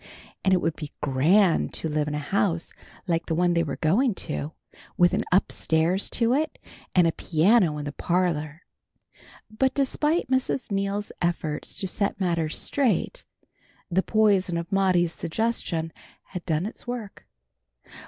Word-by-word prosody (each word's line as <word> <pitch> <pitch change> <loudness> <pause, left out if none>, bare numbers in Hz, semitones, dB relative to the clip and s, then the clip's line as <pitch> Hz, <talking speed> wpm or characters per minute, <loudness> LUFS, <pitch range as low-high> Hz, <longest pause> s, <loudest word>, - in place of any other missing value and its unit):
And 190 - +3
it 185 - +4
would 165 -1 0
be 150 -2 -8
grand 165 +7 +3
to - - -3
live 150 -1 -1
in 150 - -2
a 150 -1 -5
house 175 -5 0 0.3
like 170 -3 -1
the 165 - 0
one 175 +1 +2
they 170 - +2
were 160 - -2
going 205 - +2
to, 155 -2 -4 0.4
with 175 0 +4
an - - +1
up 185 +2 +3
stairs 165 +4 +1
to 235 0 +1
it, 310 +3 0 0.4
and 180 -2 +6
a 165 - +3
piano 165 +1 +2
in 150 - -5
the 145 - -3
parlor. 170 -1 -1 0.9
But 265 +3 +1
despite 300 +4 +1
Mrs. 260 -2 -1
Neal's 200 +1 -1
efforts 165 -3 -2
to 190 - -3
set 200 +2 -1
matters 170 -4 0
straight, 280 - 0 0.7
the 185 +2 +3
poison 195 -5 +2
of 170 +3 -5
Maudie's 185 -3 +2
suggestion 165 -4 -2 0.4
had 180 -2 -6
done 160 +1 0
its 220 - -8
work. 240 -5 -6
180 Hz, 155 wpm, -25 LUFS, 160-205 Hz, 0.9 s, and